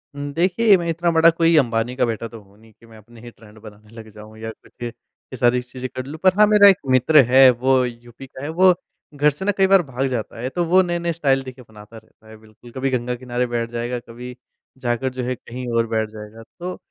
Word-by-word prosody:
हुँ, 145 Hz, 0 st, -5 dB
देखिए 195 Hz, +6 st, +3 dB
मैं 170 Hz, -1 st, -4 dB
इतना 170 Hz, +1 st, 0 dB
बड़ा 165 Hz, 0 st, +5 dB
कोई 165 Hz, 0 st, +2 dB
अंबानी 120 Hz, -2 st, 0 dB
का 130 Hz, -1 st, +1 dB
बेटा 115 Hz, -1 st, -4 dB
तो 115 Hz, 0 st, -12 dB
हूँ 100 Hz, 0 st, -24 dB
नहीं 110 Hz, 0 st, -20 dB
कि -, -, -19 dB
मैं 115 Hz, -1 st, -16 dB
अपने 115 Hz, +2 st, -17 dB
ही 120 Hz, -, -10 dB
ट्रेंड 110 Hz, -1 st, -18 dB
बनाने 105 Hz, 0 st, -15 dB
लग 110 Hz, -1 st, -11 dB
जाऊँ 110 Hz, +1 st, -13 dB
या 110 Hz, 0 st, -6 dB
कुछ -, -, -21 dB
ये 120 Hz, +2 st, -11 dB
सारी 125 Hz, +1 st, +2 dB
चीज़ें 125 Hz, +1 st, -8 dB
कर 130 Hz, -, -5 dB
लूँ। 145 Hz, +4 st, -8 dB
पर 185 Hz, -1 st, +5 dB
हाँ, 210 Hz, -, +7 dB
मेरा 210 Hz, -1 st, +6 dB
एक 195 Hz, -2 st, +6 dB
मित्र 130 Hz, +4 st, +3 dB
है 130 Hz, +1 st, +7 dB
वो 130 Hz, +2 st, +1 dB
यूपी 120 Hz, +2 st, -10 dB
का 130 Hz, +1 st, -11 dB
है 145 Hz, -, -4 dB
वो 185 Hz, +3 st, +4 dB, 0.4 s
घर 145 Hz, +1 st, +2 dB
से 150 Hz, +6 st, -6 dB
ना 205 Hz, -, +2 dB
कई 195 Hz, -1 st, +4 dB
बार 195 Hz, -1 st, +5 dB
भाग 135 Hz, -2 st, -3 dB
जाता 120 Hz, -3 st, -5 dB
है, 125 Hz, -, -3 dB
तो 175 Hz, +5 st, -2 dB
वो 185 Hz, +3 st, +4 dB
नए-नए 175 Hz, -1 st, -2 dB
स्टाइल 135 Hz, -4 st, +1 dB
देखिए 130 Hz, -1 st, -11 dB
बनाता 105 Hz, +1 st, -14 dB
रहता 110 Hz, 0 st, -20 dB
है 110 Hz, -, -13 dB
बिल्कुल, 110 Hz, +2 st, -18 dB
कभी 135 Hz, +2 st, -2 dB
गंगा 125 Hz, -1 st, -2 dB
किनारे 125 Hz, 0 st, -3 dB
बैठ 120 Hz, -1 st, -3 dB
जाएगा, 120 Hz, +1 st, -4 dB
कभी 120 Hz, +1 st, -11 dB, 0.4 s
जाकर 125 Hz, +1 st, -2 dB
जो 130 Hz, -, -4 dB
है 125 Hz, +1 st, -2 dB
कहीं 125 Hz, +2 st, -9 dB
और 115 Hz, 0 st, +1 dB
बैठ 110 Hz, -1 st, -2 dB
जाएगा। 110 Hz, +1 st, -11 dB, 0.2 s
तो 180 Hz, +1 st, -6 dB
125 Hz, 245 wpm, -20 LUFS, 115-150 Hz, 0.4 s, हाँ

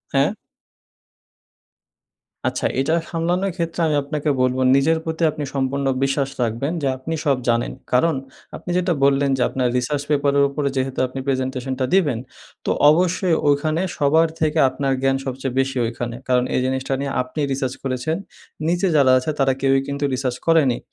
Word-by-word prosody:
হ্যাঁ। -, -, +3 dB, 2.2 s
আচ্ছা, -, -, -2 dB
এটা 135 Hz, +4 st, +1 dB, 0.2 s
সামলানোর 175 Hz, +4 st, 0 dB
ক্ষেত্রে 165 Hz, 0 st, -3 dB
আমি 150 Hz, -, +1 dB
আপনাকে 150 Hz, +1 st, -2 dB
বলবো 130 Hz, 0 st, +1 dB
নিজের 155 Hz, +4 st, +3 dB
প্রতি 160 Hz, +1 st, -2 dB
আপনি 150 Hz, 0 st, -5 dB
সম্পূর্ণ 135 Hz, +1 st, -1 dB, 0.2 s
বিশ্বাস 135 Hz, 0 st, 0 dB
রাখবেন 120 Hz, +5 st, -1 dB
যে 140 Hz, -, 0 dB
আপনি 145 Hz, +5 st, -5 dB
সব 140 Hz, -3 st, +3 dB
জানেন। 120 Hz, 0 st, +1 dB, 0.2 s
কারণ 155 Hz, +5 st, +3 dB, 0.4 s
আপনি -, -, -9 dB
যেটা 180 Hz, -1 st, +1 dB
বললেন 140 Hz, 0 st, +3 dB
যে -, -, -2 dB
আপনার 130 Hz, -1 st, 0 dB
রিসার্চ 140 Hz, +3 st, -1 dB
পেপারের 140 Hz, -1 st, +3 dB
উপরে 140 Hz, 0 st, -1 dB
যেহেতু 130 Hz, 0 st, -2 dB
আপনি 130 Hz, +1 st, -7 dB
প্রেজেন্টেশনটা 130 Hz, 0 st, -1 dB
দিবেন, 150 Hz, -11 st, +2 dB, 0.5 s
তো -, -, +1 dB, 0.2 s
অবশ্যই 175 Hz, +2 st, +2 dB
ওইখানে 155 Hz, +3 st, +2 dB, 0.2 s
সবার 160 Hz, +2 st, +4 dB
থেকে 155 Hz, 0 st, +1 dB
আপনার 135 Hz, +1 st, -1 dB
জ্ঞান 135 Hz, 0 st, +2 dB
সবচেয়ে 130 Hz, -1 st, -4 dB
বেশি 135 Hz, 0 st, 0 dB
ওইখানে। 115 Hz, +1 st, -4 dB
কারণ 125 Hz, -1 st, +3 dB
এই -, -, +2 dB
জিনিসটা 130 Hz, +1 st, -1 dB
নিয়ে 140 Hz, 0 st, -2 dB
আপনিই 140 Hz, +3 st, -3 dB
রিসার্চ 130 Hz, -1 st, -1 dB
করেছেন। 130 Hz, +4 st, -1 dB, 0.5 s
নিচে 175 Hz, +3 st, +1 dB
যারা 140 Hz, -3 st, +5 dB
আছে 130 Hz, +5 st, -1 dB
তারা 135 Hz, -1 st, +3 dB
কেউই 135 Hz, 0 st, +3 dB
কিন্তু 140 Hz, +1 st, -3 dB
রিসার্চ 130 Hz, -1 st, -2 dB
করেনি। 155 Hz, -7 st, +3 dB
140 Hz, 160 wpm, -21 LUFS, 130-155 Hz, 2.2 s, যারা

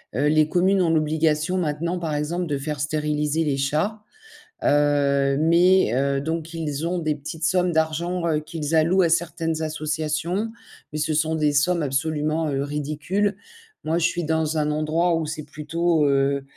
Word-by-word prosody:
heu, 140 Hz, +5 st, +2 dB
les 155 Hz, 0 st, +3 dB
communes 190 Hz, +2 st, +2 dB
ont 170 Hz, -, +2 dB
l'obligation 155 Hz, +2 st, +1 dB
maintenant 170 Hz, +1 st, -1 dB
par 165 Hz, -3 st, -3 dB
exemple, 160 Hz, +5 st, -2 dB
de 145 Hz, -4 st, -2 dB
faire 145 Hz, +1 st, -4 dB
stériliser 150 Hz, +1 st, -1 dB
les 145 Hz, -2 st, 0 dB
chats. 155 Hz, +11 st, -1 dB, 0.6 s
Heu, 140 Hz, -1 st, +2 dB
mais 170 Hz, -, +4 dB
heu, 140 Hz, +1 st, +1 dB
donc 160 Hz, +3 st, -4 dB
ils 155 Hz, -2 st, -3 dB
ont 175 Hz, +1 st, -1 dB
des 155 Hz, -2 st, -1 dB
petites 155 Hz, +3 st, -5 dB
sommes 180 Hz, 0 st, +2 dB
d'argent, 170 Hz, +2 st, 0 dB
heu, 155 Hz, -2 st, +1 dB
qu'ils 155 Hz, 0 st, -3 dB
allouent 170 Hz, +4 st, +4 dB
à -, -, +4 dB
certaines 165 Hz, -1 st, -1 dB
associations, 155 Hz, +6 st, -2 dB, 0.4 s
mais 150 Hz, -, -4 dB
ce 155 Hz, +1 st, 0 dB
sont 160 Hz, +1 st, +1 dB
des 150 Hz, -2 st, +1 dB
sommes 170 Hz, +3 st, +2 dB
absolument, 155 Hz, +2 st, -1 dB
heu, 135 Hz, 0 st, -1 dB
ridicules. 150 Hz, +8 st, -2 dB, 0.5 s
Moi, 165 Hz, +2 st, +1 dB
je 170 Hz, -, +2 dB
suis 175 Hz, -1 st, -3 dB
dans 160 Hz, 0 st, 0 dB
un 150 Hz, 0 st, +1 dB
endroit 160 Hz, +3 st, +1 dB
où 165 Hz, -1 st, -1 dB
c'est 155 Hz, 0 st, -5 dB
plutôt, 160 Hz, +1 st, 0 dB
heu, 140 Hz, 0 st, +1 dB
155 Hz, 170 wpm, -23 LUFS, 150-170 Hz, 0.6 s, mais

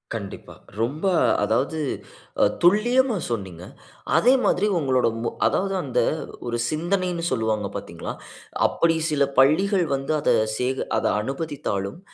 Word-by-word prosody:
கண்டிப்பா. 100 Hz, -3 st, -7 dB, 0.3 s
ரொம்ப 145 Hz, +10 st, -2 dB, 0.4 s
அதாவது 130 Hz, +8 st, 0 dB, 0.6 s
அ -, -, +7 dB, 0.2 s
துல்லியமா 230 Hz, +6 st, +3 dB
சொன்னீங்க. 95 Hz, -6 st, -5 dB, 0.5 s
அதே 250 Hz, +3 st, +5 dB
மாதிரி 195 Hz, +4 st, +2 dB
உங்களோட, 130 Hz, -4 st, +2 dB, 0.2 s
மோ -, -, 0 dB, 0.2 s
அதாவது 195 Hz, 0 st, 0 dB
அந்த 130 Hz, -, -1 dB, 0.5 s
ஒரு 120 Hz, 0 st, -1 dB
சிந்தனைனு 175 Hz, +2 st, -1 dB
சொல்லுவாங்க, 110 Hz, -4 st, 0 dB
பாத்தீங்களா? -, -, -6 dB, 0.5 s
அப்படி 165 Hz, -1 st, +1 dB
சில 145 Hz, -2 st, +2 dB, 0.2 s
பள்ளிகள் 180 Hz, +7 st, +4 dB
வந்து 135 Hz, +3 st, -2 dB
அத -, -, 0 dB, 0.3 s
சேக 130 Hz, +2 st, -1 dB
அத -, -, -1 dB, 0.2 s
அனுமதித்தாலும், 135 Hz, -, -4 dB
145 Hz, 120 wpm, -23 LUFS, 120-180 Hz, 0.6 s, அ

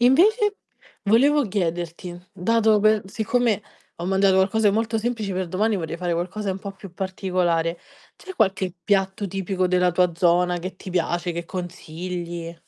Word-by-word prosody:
Invece 405 Hz, -, +4 dB, 0.5 s
volevo 275 Hz, +8 st, +4 dB
chiederti, 175 Hz, -2 st, -3 dB
dato 220 Hz, +3 st, +3 dB
pe 215 Hz, 0 st, +4 dB
siccome 220 Hz, +1 st, 0 dB, 0.3 s
ho 170 Hz, -, -5 dB
mangiato 195 Hz, 0 st, +3 dB
qualcosa 205 Hz, +3 st, +3 dB
di 200 Hz, -, +2 dB
molto 225 Hz, +1 st, 0 dB
semplice, 220 Hz, -3 st, -2 dB
per 185 Hz, -1 st, -2 dB
domani 210 Hz, +5 st, +1 dB
vorrei 165 Hz, -2 st, -4 dB
fare 175 Hz, 0 st, -2 dB
qualcosa 190 Hz, +4 st, -2 dB
un 185 Hz, -, -6 dB
po' 200 Hz, -, -5 dB
più 195 Hz, -2 st, -12 dB
particolare, 180 Hz, -3 st, -1 dB, 0.4 s
c'è 375 Hz, -, -10 dB
qualche 190 Hz, -, +1 dB
piatto 195 Hz, +1 st, +1 dB
tipico 190 Hz, 0 st, -1 dB
della 180 Hz, 0 st, +3 dB
tua 175 Hz, 0 st, +2 dB
zona 175 Hz, +1 st, +2 dB
che 185 Hz, +1 st, -6 dB
ti 185 Hz, -, -9 dB
piace, 175 Hz, 0 st, -1 dB
che 170 Hz, 0 st, -4 dB
consigli? 175 Hz, -1 st, -6 dB
190 Hz, 155 wpm, -23 LUFS, 175-215 Hz, 0.5 s, Invece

